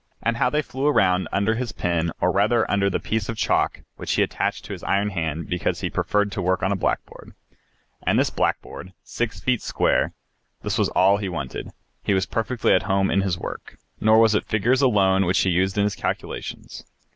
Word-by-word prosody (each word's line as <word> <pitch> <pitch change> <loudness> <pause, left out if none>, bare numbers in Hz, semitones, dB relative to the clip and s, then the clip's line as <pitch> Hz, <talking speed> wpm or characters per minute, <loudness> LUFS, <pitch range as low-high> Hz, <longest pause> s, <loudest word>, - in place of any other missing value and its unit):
And 115 0 0
how 125 0 +2
they 150 +3 0
flew 135 +1 -2
around 95 -10 +3
under 100 +3 +1
his 120 0 -3
pen, 85 -1 -1
or - - +2
rather 110 +3 +2
under 100 -1 +2
the 95 - -1
piece 110 -2 -2
of 115 - -3
chalk - - +1 0.2
which - - -3
he - - +3
attached - - -2
to - - -6
his - - -8
iron 100 +1 +1
hand, 80 -3 -3
because 90 -1 -2
he - - -2
preferred 105 0 0
to 100 - -3
work 90 0 0
on 95 - +1
a - - +1
blackboard. 95 - -4 0.7
And - - +1
this - - +2
blackboard, 95 +1 -3
six 120 -2 -3
feet 125 -2 0
square, - - +1 0.5
this 105 +2 -1
was 105 - +2
all 95 +2 +4
he 100 -2 -3
wanted, 75 -7 -5 0.3
he 100 - +1
was 95 - +1
perfectly 115 +1 0
at 90 - +4
home 95 0 +2
in 100 - +2
his 95 -3 -1
work. - - -8 0.2
Nor 110 0 +5
was 110 -1 +5
it 105 - 0
figures 120 +5 +2
alone 95 -7 +3
which 90 +3 +1
he 95 - +2
used 95 +3 +1
in 100 - +3
his 105 0 0
calculations. - - -5
100 Hz, 210 wpm, -23 LUFS, 95-110 Hz, 0.7 s, Nor